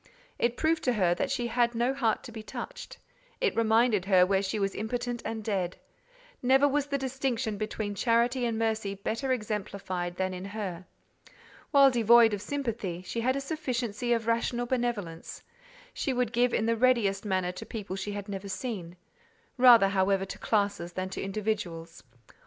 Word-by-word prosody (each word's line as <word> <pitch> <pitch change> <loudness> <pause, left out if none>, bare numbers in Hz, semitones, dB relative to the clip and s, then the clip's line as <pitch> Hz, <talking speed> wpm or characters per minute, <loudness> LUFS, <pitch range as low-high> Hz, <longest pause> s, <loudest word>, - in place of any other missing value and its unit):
It 235 0 +1
proved 320 0 +1
to 250 - +3
her 185 -6 +2
that 275 - -2
she 260 -3 -1
had 235 0 +1
no 240 +3 +1
heart 230 -6 0
to 240 - -9
be 220 -1 -7
touched: 215 - -8 0.4
it 480 -4 +1
reminded 225 -3 +3
her 185 -2 +5
where 190 +1 +2
she 200 +2 -2
was 195 -2 0
impotent 240 +2 -3
and 225 -1 -4
dead. 190 -4 -2 0.6
Never 265 +3 +5
was 290 0 0
the 280 -1 -1
distinction 260 -4 -2
between 215 0 -3
charity 235 +4 +2
and 225 -1 -2
mercy 220 -3 -1
better 225 +7 -2
exemplified 200 -6 -3
than 185 0 -1
in 180 0 -6
her. 195 -3 -5 0.8
While 275 -2 +6
devoid 235 -1 +6
of 205 - -3
sympathy, 220 -8 -3
she 230 +5 -3
had 255 +3 +1
a - - -1
sufficiency 245 -6 -3
of 230 -2 +1
rational 235 +1 0
benevolence: 235 -10 -3 0.5
she 270 - -1
would 245 -2 -1
give 240 +1 +3
in 220 - +1
the 230 0 +2
readiest 225 -5 +2
manner 185 -3 0
to 180 - -8
people 205 -4 -6
she 205 +1 -4
had 205 0 -6
never 200 0 -6
seen—rather, 225 - +1
however, 195 0 +1
to 195 - -8
classes 200 -5 0
than 185 +1 -3
to 190 - -5
individuals. 195 -5 -3
220 Hz, 170 wpm, -29 LUFS, 195-245 Hz, 0.8 s, While